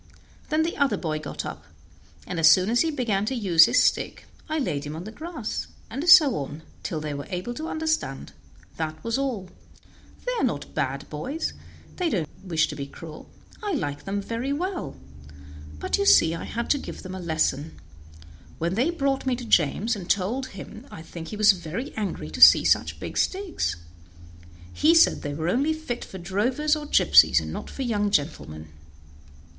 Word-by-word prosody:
Then 315 0 +2
the 335 - -3
other 280 -2 +2
boy 155 -3 -3
got - - -6
up, - - -7 0.6
and 170 - -4
as 160 -1 +7
soon 185 +5 +4
as 240 - +3
he 325 - +1
began 235 -9 0
to 265 - -1
use 175 -8 +6
his - - +3
stick - - 0 0.2
I 310 - -1
laid 170 - -2
him 150 0 -6
on 165 - -6
the 215 - -8
grass, 310 -4 -5 0.2
and 280 +9 -2
so 315 -7 +8
on, 145 +2 -6 0.2
till 160 - -3
they 150 -1 -4
were 140 0 -6
able 185 +5 -4
to 310 +6 -5
understand 315 - -2 0.4
that 155 -1 -4
was 230 +3 -1
all. 225 -10 -3 0.7
They - - 0
are - - 0
not 185 - -2
bad 140 +2 -2
boys; 265 - -3 0.4
they 360 -2 0
don't 175 - -1 0.2
wish 165 -4 +1
to 150 - -5
be 140 -1 -5
cruel. 155 +1 -11 0.3
I 415 -3 -2
like 145 - -3
them 200 +1 -2
very 235 +6 -3
well; 355 - -3 0.8
but - - -1
you 400 - +1
see 165 - +6
I 165 - -5
had 235 +1 -4
to 285 - +2
give - - -8
them 185 -1 -7
a 190 - -6
lesson. 160 -2 -1 0.8
When 170 +2 -1
they 245 - +1
brought 275 -5 -1
me 255 - +2
to 245 0 -7
James 215 +5 +2
and 190 -3 -8
told 225 +8 0
him 220 +4 -10
I 160 - -10
think 165 0 -9
he 210 - -6
was 215 0 +7
very 185 - -5
angry 210 -3 -4
to - - -6
see - - +9
such - - +2
big - - -4
sticks. 385 - -1 1.0
He 320 +3 +4
said 330 - +5
they 145 0 -4
were 160 +2 -3
only 275 - +2
fit 315 -7 -5
for 190 - -9
drovers 245 - 0
or 300 -1 -6
gypsies, - - +6
and - - -6
not - - -6
for 270 - -5
young 210 -4 0
gentlemen." 110 - -2
210 Hz, 195 wpm, -25 LUFS, -, 1.0 s, see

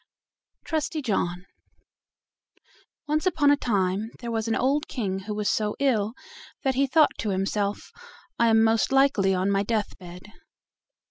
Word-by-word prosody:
TRUSTY 315 -1 -2
JOHN 180 -5 -1 1.6
Once 310 +4 0
upon 300 -5 +3
a - - +5
time 200 -4 -1
there 235 -2 -5
was 225 0 -2
an 225 - +1
old 280 +4 +1
king 195 -7 -3
who 210 +2 -6
was 210 -1 -2
so 210 -1 0
ill 225 -6 +1 0.5
that 265 -2 +1
he 275 +2 +1
thought 305 +3 +4
to 215 - -2
himself, 200 +1 -2 0.5
"I 235 - +4
am 225 0 +5
most 225 +2 +2
likely 270 -9 +3
on 185 +2 0
my 195 0 +2
death 215 0 -2
bed." 180 -1 -11
220 Hz, 150 wpm, -25 LUFS, 200-270 Hz, 1.6 s, a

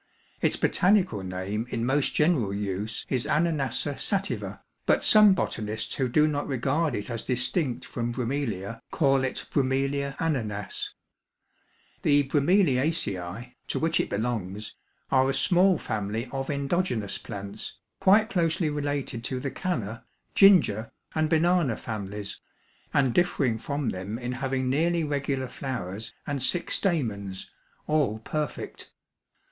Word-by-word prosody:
Its - - +3
botanical 180 - +3
name 95 +5 -3
in 115 -1 -2
most 135 +2 +1
general 150 - +3
use 100 +2 -3
is 130 -1 0
Ananassa 150 -3 +1
sativa, 200 -1 -2 0.2
but - - +3
some 210 -3 +7
botanists 110 - -2
who 130 -2 0
do 150 +5 +4
not 145 -1 -1
regard 140 +3 0
it 105 +4 -4
as 115 -2 -3
distinct 125 +2 -1
from 120 -1 -3
Bromelia, 115 -5 -3
call 135 -3 +2
it 130 - -2
B. - - +3 0.6
ananas. 110 -11 -2 1.1
The 145 -1 +4
Bromeliaceæ, 130 - +1
to - - -2
which 165 0 +1
it - - 0
belongs, 105 -2 -3 0.4
are 130 0 +4
a 135 - +1
small 180 +5 +4
family 110 +2 -3
of 135 0 -3
endogenous 140 - -1
plants, 100 0 -7 0.2
quite 215 +3 +5
closely 165 -3 +1
related 145 -5 -2
to 130 - -2
the 140 +1 -3
canna, 115 - -3 0.3
ginger, 175 - +5 0.2
and 155 -1 +1
banana 165 -5 +3
families, 105 -2 -5 0.5
and 135 -4 +2
differing 140 -10 +2
from 140 0 -2
them 95 +4 -4
in 120 0 -4
having 130 0 -1
nearly 165 +5 +2
regular 140 -3 -1
flowers 110 -7 -5
and 145 -2 -2
six 170 +6 +1
stamens, 105 - -2 0.3
all 150 -8 +1
perfect. 150 +5 -4
130 Hz, 130 wpm, -27 LUFS, 110-155 Hz, 1.1 s, some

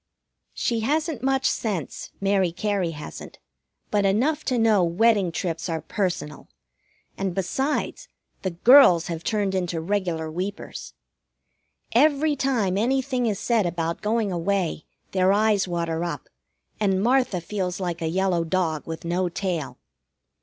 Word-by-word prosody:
She 235 -2 0
hasn't 300 +3 -1
much 270 0 +1
sense, 195 - -3
Mary 195 -3 +2
Cary 200 -1 -1
hasn't, 150 -2 -9 0.5
but 205 -1 +2
enough 255 +11 +1
to 255 - 0
know 220 -4 +4
wedding 195 +2 +3
trips 165 -1 -3
are 165 -1 -1
personal, 175 -7 -3 0.7
and, 190 -2 -2
besides, 265 - -2 0.3
the 190 - -1
girls 180 - +6
have 165 -1 -4
turned 205 -3 0
into 180 -3 -1
regular 170 -3 -2
weepers. 190 +5 -6 1.0
Every 295 +3 +3
time 230 -9 0
anything 255 +1 +1
is 210 -3 0
said 225 -6 +1
about 170 -1 -2
going 215 -1 0
away 175 -2 -1 0.3
their 185 0 +3
eyes 205 -1 +2
water 170 -1 -2
up, 175 - -5 0.5
and 195 -2 +1
Martha 250 -6 +2
feels 180 0 -3
like 175 -3 -3
a 165 - -1
yellow 185 -1 +1
dog 165 -3 -1
with 165 0 -6
no 175 +2 0
tail. 170 -5 -3
195 Hz, 135 wpm, -24 LUFS, 170-225 Hz, 1.0 s, girls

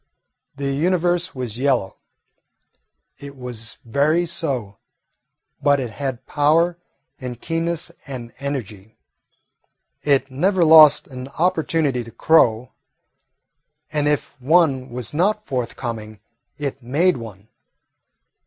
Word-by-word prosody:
The 140 0 -2
Universe 175 +3 +1
was 125 -3 -5
yellow. 130 -8 0 1.2
It 140 -1 -10
was 120 -3 -6
very 150 +8 +2
so. 135 - -3 0.8
But 145 -1 +3
it 125 -4 -4
had 130 0 -5
power 165 +4 +2 0.4
and 125 -3 -6
keenness 170 +2 -2 0.2
and 125 -4 -7
energy. 110 -7 -6 1.0
It 135 -2 +1
never 180 +6 +2
lost 155 -2 +8
an 130 -1 -8
opportunity 160 -4 0
to 115 - -11
crow, 120 -7 +3 1.2
and 150 -1 +1
if 145 -3 -2
one 140 -3 +3
was 120 0 -4
not 210 +7 +1
forthcoming, 115 -4 -4 0.4
it 140 -2 -4
made 150 +9 +2
one. 110 -3 -10
140 Hz, 105 wpm, -21 LUFS, 125-160 Hz, 1.2 s, lost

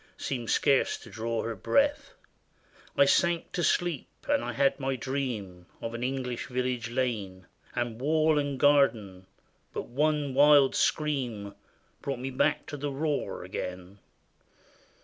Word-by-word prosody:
Seemed 120 -4 -4
scarce 140 -1 +3
to - - -14
draw 115 0 -2
her 115 0 -3
breath. 290 - +1 0.8
I 140 - +7
sank 170 +3 +2
to 175 - -2
sleep, 175 -6 0 0.2
and 290 0 +2
I - - -3
had 140 +1 +2
my 135 -1 -1
dream 115 -9 -4
Of 115 - -5
an 120 +1 -4
English 125 -1 -3
village 125 -2 -2
lane. 110 -7 -2 0.3
And 120 -1 -2
wall 155 +1 +3
and 140 -2 -2
garden; 110 -11 +3 0.2
— - - -41
but - - -3
one 150 +1 0
wild 145 0 +6
scream 125 -10 -1 0.5
Brought 140 -2 -3
me 130 +2 -4
back 150 +3 +1
to 145 - -6
the 145 +1 -3
roar 145 +1 -2
again. 90 +2 -6
130 Hz, 145 wpm, -28 LUFS, 115-145 Hz, 0.8 s, I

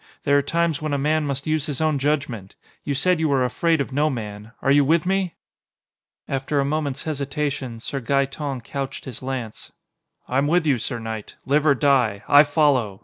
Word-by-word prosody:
There 145 - +3
are 145 - +5
times 165 +1 0
when 155 -1 -2
a - - +1
man 150 +2 +1
must 140 0 -3
use 155 -1 0
his 145 -3 -3
own 155 -3 +1
judgment! 135 -9 -2 0.3
You 140 - -2
said 180 +5 +2
you 160 -1 +1
were 135 -2 +2
afraid 165 +6 +1
of 140 - -2
no 150 +3 +2
man. 105 -4 -6
Are 135 - +3
you 145 0 +5
with 160 +4 +2
me?" 190 -2 0 0.9
After 135 +2 -1
a 140 - +1
moment's 145 -2 -2
hesitation, 140 -4 -3
Sir 135 +4 -4
Gaeton 140 +1 -1
couched 135 +2 -5
his 130 -5 -7
lance. 130 -4 -5 0.6
"I'm 135 +3 +1
with 175 +2 +2
you, 135 -5 +2
sir 120 +2 -2
knight! 110 -2 -6
Live 150 +3 +2
or 140 - +5
die, 125 -7 +2
I 145 - +8
follow! 145 -9 +1
140 Hz, 195 wpm, -23 LUFS, 130-150 Hz, 0.9 s, I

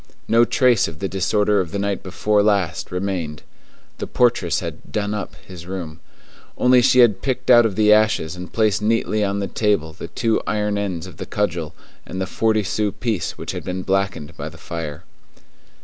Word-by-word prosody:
No 115 +1 +5
trace 120 -2 +3
of 80 - -8
the 95 - -2
disorder 105 +2 +1
of 90 - -5
the 90 - -4
night 100 -1 -1
before 105 +2 +1
last 95 -5 0
remained. 90 -5 -3 0.6
The - - -4
portress 120 -9 +2
had - - -8
"done 105 +5 -1
up" 105 -3 -5
his 90 -2 -10
room; 90 -4 -6 0.6
only 125 0 +5
she 125 0 +5
had 105 -5 +4
picked 130 -1 0
out 120 -1 +7
of 100 - -6
the 105 0 +5
ashes 105 -6 +2
and 90 0 -8
placed 110 -2 +1
neatly 110 -1 +1
on 100 0 0
the 100 -1 -2
table 100 -9 0
the - - -8
two 115 -1 0
iron 105 0 0
ends 95 -5 -3
of - - -12
the - - -6
cudgel 85 -6 -2 0.3
and 95 - -7
the 95 - 0
forty 110 +3 +1
sou 105 +1 -1
piece 110 -8 -3
which - - -5
had - - -6
been 90 0 -4
blackened 95 -5 -1
by 75 +2 -6
the 80 - -14
fire. 80 -1 -6
100 Hz, 195 wpm, -21 LUFS, 90-110 Hz, 0.6 s, out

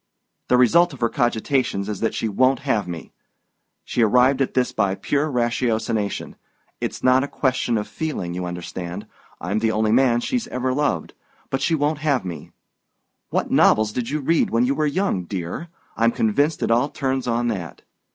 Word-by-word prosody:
"The 125 - +4
result 165 +7 +4
of 135 - -11
her 115 - +2
cogitations 120 -4 0
is 105 -3 -4
that 115 - -1
she 115 - -1
won't 130 +6 +2
have 115 -9 0
me. 85 -2 -7 0.7
She 120 - -1
arrived 125 +5 +4
at 135 - -1
this 125 -1 +2
by 100 -3 0
pure 145 +9 -1
ratiocination 115 -4 -1 0.4
it's - - -4
not 130 +1 +4
a - - -2
question 130 -4 0
of 105 - -3
feeling, 150 - -4
you 90 0 -3
understand. 90 0 -6 0.3
I'm 100 +6 -1
the 110 0 +1
only 110 0 +1
man 120 0 +4
she's 245 - -2
ever 130 0 -1
loved 130 - -1 0.4
but 135 - -1
she 165 - +2
won't 145 0 0
have 145 -7 0
me. 85 -3 -7 0.8
What - - -1
novels 110 -1 +4
did 120 +1 -3
you 150 +1 -2
read 160 +4 +2
when 115 +2 +2
you 135 - +1
were 155 +1 0
young, 145 - -1
dear? 90 - -5 0.3
I'm 115 +1 +3
convinced 140 +9 +1
it - - +1
all 120 +5 +3
turns 130 -2 -2
on 120 0 0
that. 90 -7 -5
120 Hz, 180 wpm, -22 LUFS, 105-140 Hz, 0.8 s, The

